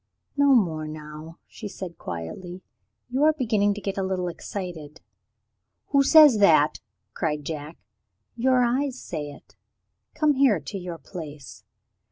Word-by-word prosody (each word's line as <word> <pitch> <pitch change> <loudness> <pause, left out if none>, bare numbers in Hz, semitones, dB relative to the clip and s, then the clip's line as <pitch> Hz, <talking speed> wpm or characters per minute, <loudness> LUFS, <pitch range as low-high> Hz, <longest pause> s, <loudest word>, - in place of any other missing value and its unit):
"No 285 -1 +5
more 160 -9 +1
now," 155 +1 -9
she 215 - -9
said 185 -3 -8
quietly; 175 - -7 0.5
"you 265 +4 +1
are 310 +1 +5
beginning 215 -8 +1
to 210 - -7
get 195 0 -3
a - - 0
little 185 -1 -1
excited." 170 -4 -7 0.9
"Who 280 -1 +4
says 290 -5 +7
that?" 155 -6 +4 0.3
cried 150 -3 -2
Jack. 155 +1 -6 0.6
"Your 250 +1 +3
eyes 260 +2 0
say 150 -3 -5
it. 145 - -15 0.6
Come 305 -1 +3
here 260 -9 +3
to 200 - -7
your 175 -2 -6
place." 145 - -10
185 Hz, 140 wpm, -25 LUFS, 155-245 Hz, 0.9 s, says